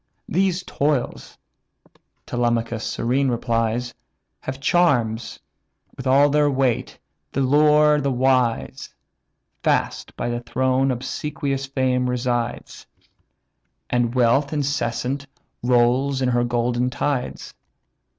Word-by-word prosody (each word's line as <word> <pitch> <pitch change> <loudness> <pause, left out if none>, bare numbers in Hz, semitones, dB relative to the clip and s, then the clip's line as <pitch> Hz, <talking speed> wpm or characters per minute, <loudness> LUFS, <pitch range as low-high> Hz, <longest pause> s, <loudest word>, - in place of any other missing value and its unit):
"Those 185 0 0
toils 145 -6 -2 0.9
(Telemachus 120 -1 -1
serene 130 +4 0
replies) 115 0 -1 0.5
Have 135 +1 -6
charms, 135 -9 +1 0.6
with 130 -1 -6
all 140 +2 +5
their 150 0 +3
weight, 130 -3 0 0.4
t'allure 150 +2 +4
the 140 0 0
wise. 125 -2 0 0.7
Fast - - -1
by - - -2
the 120 0 -2
throne 130 +2 0
obsequious 135 +2 -3
fame 130 -2 0
resides, 120 -1 -3 1.0
And 120 0 +1
wealth 130 +3 +3
incessant 140 -2 -2 0.3
rolls 125 +3 +2
her 120 -2 +2
golden 120 +1 0
tides. 135 0 -3
130 Hz, 90 wpm, -22 LUFS, 120-140 Hz, 1.0 s, all